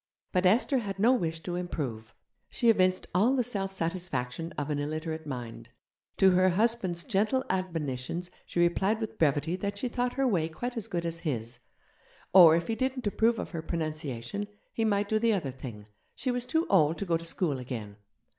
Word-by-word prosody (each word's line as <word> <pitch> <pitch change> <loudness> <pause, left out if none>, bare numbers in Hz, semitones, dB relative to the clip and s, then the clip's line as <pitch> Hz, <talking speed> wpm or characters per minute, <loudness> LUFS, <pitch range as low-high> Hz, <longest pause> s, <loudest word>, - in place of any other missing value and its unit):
But 185 -1 +3
Esther 250 +7 +3
had 200 -4 -4
no 230 +6 +5
wish 165 -9 -1
to 175 - -4
improve. 135 -11 -4 0.3
She 235 -2 +4
evinced 185 -3 +2
all 220 +9 +4
the 250 - +2
self 200 -5 -1
satisfaction 170 -4 -3
of 145 0 -3
an 145 - -1
illiterate 155 +1 -4
mind. 120 -3 -6 0.5
To 190 -1 +6
her 185 +1 +4
husband's 190 -3 +1
gentle 225 +5 +1
admonitions 170 -2 -3 0.2
she - - -3
replied 190 +5 +2
with 220 -1 -5
brevity 150 +2 +2
that 200 +1 -3
she 250 +4 -2
thought 245 +1 -1
her 270 0 +1
way 170 -8 +1
quite 245 +10 -5
as 225 -2 -4
good 175 -5 -2
as 165 0 -3
his; 120 -7 -3 0.7
or, 170 -4 +9
if 170 0 0
he 225 - 0
didn't 260 +1 -2
approve 225 +3 +2
of - - -5
her 165 -3 -4
pronunciation, 155 - -4 0.3
he 225 - -1
might 205 -2 +1
do 215 +1 +1
the 230 0 +3
other 165 -10 -1
thing, 120 -5 -9 0.3
she 255 - -1
was 245 0 -2
too 320 +6 +1
old 160 -4 +4
to 200 - -3
go 170 -3 +1
to 165 - -2
school 165 -4 -1
again. 115 -5 -6
180 Hz, 195 wpm, -29 LUFS, 155-215 Hz, 0.7 s, or